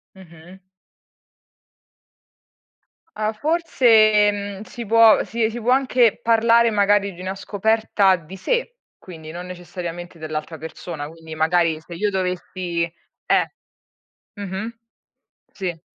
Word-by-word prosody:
Mh-mh. 180 0 -15 2.6
Ah 215 0 -1
forse, 220 -7 +4
mhmm, 200 -1 -6
si 235 0 -8
può 225 0 +6
si 225 -1 -1
si 240 +1 -6
può 245 +3 +2
anche 250 -4 +3
parlare 230 0 +4
magari 200 -1 +2
di 175 - -13
una 190 +1 -4
scoperta 205 -1 +1
di 175 +2 -8
sé, 485 - -2 0.2
quindi 160 -3 -11
non 175 +1 -7
necessariamente 175 -1 -8
dell'altra 155 +1 -5
persona, 160 -1 -7
quindi 160 0 -11
magari 160 0 +1
se 170 +2 -11
io 205 +4 0
dovessi 180 -2 -2 0.4
Eh. - - +2 0.9
Mh-mh. 200 +4 -5 0.8
Sì. 175 -4 -5
190 Hz, 115 wpm, -21 LUFS, 170-220 Hz, 2.6 s, può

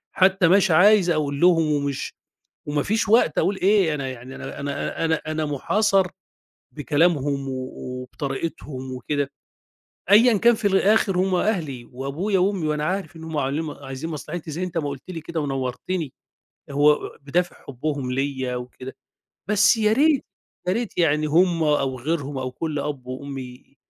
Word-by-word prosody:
حتّى 190 -1 +4
مش 190 +1 +4
عايز 185 +3 +6
أقول 145 -4 0
لهم 165 -3 +4
ومش 140 -2 -2 0.5
وما 145 0 0
فيش 215 +3 0
وقت 215 -8 +4
أقول 195 +1 +2
إيه، 190 -5 +3
أنا 140 -2 -3
يعني 130 +1 -9
أنا - - -7
أنا 140 +3 -3
أنا 160 -1 +1
أنا 155 0 -1
مُحاصر 195 +7 +2 0.7
بكلامهم 145 -1 +1
و - - -3
و 130 0 -6
وبطريقتهم 135 0 -5
وكده، 140 +2 -2 0.8
أيًا 220 +1 +6
كان 235 +4 +5
في 220 -1 -2
الآخِر 195 -1 +3
هم 185 0 +2
أهلي 165 - -1
وأبويا 145 +11 -1
وأمي 190 -3 +1
وأنا 150 0 -1
عارف 190 +1 -3
إن 160 - -9
هم 160 -1 -5
عاملين 145 +3 -1
ما 145 -3 -8
عايزين 135 +5 -5
مصلحتي، 160 +2 -6
زي 165 +4 -4
أنت 175 -2 -3
ما 145 -3 -2
قُلت 140 -2 -6
لي 165 - -5
كده 165 +1 -4
ونوّرتني، 135 +3 -3 0.6
هو 145 +2 +5
آآ - - -7
بدافِع 175 +6 -1
حبّهم 140 -1 -3
ليّا 130 -1 -2
وكده. 125 +1 -8 0.5
بس 210 +2 +5
يا 215 -1 +2
ريت، 285 +3 +3 0.4
يا - - +3
ريت 230 -1 -3
يعني 155 -2 +2
هم 170 +2 +3
أو 135 -4 +1
غيرهم 145 -1 -2
أو 130 -1 -3
كل 155 +3 -3
أب 140 -3 -4
وأم 135 +2 -6
ي 125 +1 -11
155 Hz, 165 wpm, -23 LUFS, 135-185 Hz, 0.8 s, عايز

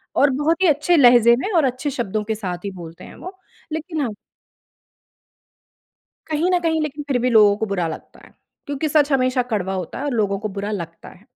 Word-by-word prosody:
और 285 - +4
बहुत 310 +7 0
ही - - +5
अच्छे 300 +3 +2
लहजे 240 -3 +6
में 395 - -3
और 310 - +4
अच्छे 255 +3 -2
शब्दों 220 -5 -3
के 220 +1 -3
साथ 180 -3 -6
ही 200 - -3
बोलते 170 -3 -11
हैं - - -12
वो, 375 +1 -10 0.4
लेकिन 315 0 -4
हाँ 255 - -1 2.2
कहीं 315 +4 0
न 360 - +3
कहीं 320 -1 0
लेकिन 295 -1 -4
फिर 270 - +1
भी 250 - +1
लोगों 210 -3 +5
को 220 - -2
बुरा 190 -5 -2
लगता 160 - -9
है, - - -20 0.3
क्योंकि 285 +1 -3
सच 295 -1 +2
हमेशा 255 -1 +2
कड़वा 190 -2 -1
होता 185 +3 -5
है 285 - -4
और 285 - -1
लोगों 205 -4 0
को 215 - -4
बुरा 205 +2 -3
लगता 170 -4 -7
है। 195 - -19
255 Hz, 210 wpm, -21 LUFS, 205-300 Hz, 2.2 s, लहजे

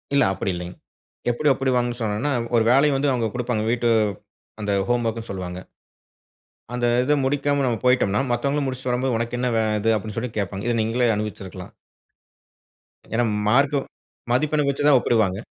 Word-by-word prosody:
இல்ல, - - +5
அப்படி 95 0 -2
இல்லைங்க. 90 0 -7 0.6
எப்படி 150 +6 -1
ஒப்பிடுவாங்கனு 125 -2 0
சொன்னோம்னா, 110 +6 -1 0.2
ஒரு 115 - +4
வேலைய 140 +2 +4
வந்து 140 +1 +1
அவுங்க 120 -3 0
குடுப்பாங்க. 120 -3 -1
வீட்டு 120 -1 +1 0.7
அந்த 105 -1 -1 0.2
ஹோம்வொர்க்னு 115 -2 -1
சொல்வாங்க. 90 -2 -5 1.2
அந்த 120 0 0 0.2
இத 145 +3 +3
முடிக்காம 145 0 +1
நம்ப 115 -3 0
போயிட்டோம்ன்னா, 115 -5 +3
மத்தவங்க 140 +4 0
முடிச்சிட்டு 130 -1 -3
வரும்போது, 125 0 0
"உனக்கு 115 +1 -2
என்ன 125 0 0
வே 110 - +3 0.2
இது?" 115 +2 +2
அப்டீன்னு 105 0 -6
சொல்லி 125 +1 -3
கேப்பாங்க. 100 0 -3
இத 120 - +1
நீங்களே 120 +2 +1
அனுபவிச்சிருக்கலாம். 95 -3 -6 1.4
ஏனா 120 +2 +2 0.2
மார்க் 140 +5 +3 0.5
மதிப்பெண் 150 +3 +1
வைச்சு 140 +1 -2
தான் 140 - +7
ஒப்பிடுவாங்க. 105 -6 +1
120 Hz, 150 wpm, -23 LUFS, 110-130 Hz, 1.4 s, தான்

